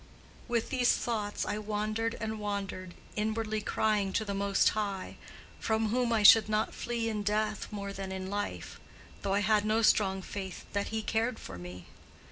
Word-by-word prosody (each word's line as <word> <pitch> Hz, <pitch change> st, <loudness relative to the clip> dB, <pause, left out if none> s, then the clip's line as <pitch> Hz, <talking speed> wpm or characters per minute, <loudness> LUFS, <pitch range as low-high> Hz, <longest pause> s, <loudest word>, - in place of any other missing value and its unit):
With 235 Hz, +1 st, -1 dB
these 250 Hz, -3 st, +4 dB
thoughts 210 Hz, -3 st, -2 dB
I 210 Hz, 0 st, -2 dB
wandered 215 Hz, +2 st, -1 dB
and 220 Hz, 0 st, -3 dB
wandered, 195 Hz, -3 st, -4 dB, 0.2 s
inwardly 215 Hz, 0 st, -1 dB
crying 210 Hz, -2 st, +1 dB
to 220 Hz, -, 0 dB
the 200 Hz, -, -2 dB
Most 200 Hz, 0 st, +3 dB
High, 200 Hz, -3 st, -3 dB, 0.4 s
from 220 Hz, 0 st, +1 dB
whom 245 Hz, +1 st, +1 dB
I 220 Hz, -2 st, +2 dB
should 215 Hz, +1 st, +9 dB
not 215 Hz, +1 st, +1 dB
flee 235 Hz, -1 st, -2 dB
in 215 Hz, -2 st, -1 dB
death 215 Hz, +1 st, 0 dB
more 200 Hz, -1 st, -5 dB
than 195 Hz, -1 st, -5 dB
in 190 Hz, 0 st, -4 dB
life—though 200 Hz, 0 st, -5 dB
I 205 Hz, -, +2 dB
had 210 Hz, 0 st, +3 dB
no 215 Hz, +2 st, +2 dB
strong 190 Hz, -3 st, +3 dB
faith 190 Hz, -2 st, -6 dB
that 200 Hz, 0 st, 0 dB
He 220 Hz, 0 st, -2 dB
cared 225 Hz, +2 st, 0 dB
for 90 Hz, -2 st, -8 dB
me. 90 Hz, 0 st, -9 dB
210 Hz, 170 wpm, -31 LUFS, 200-220 Hz, 0.4 s, should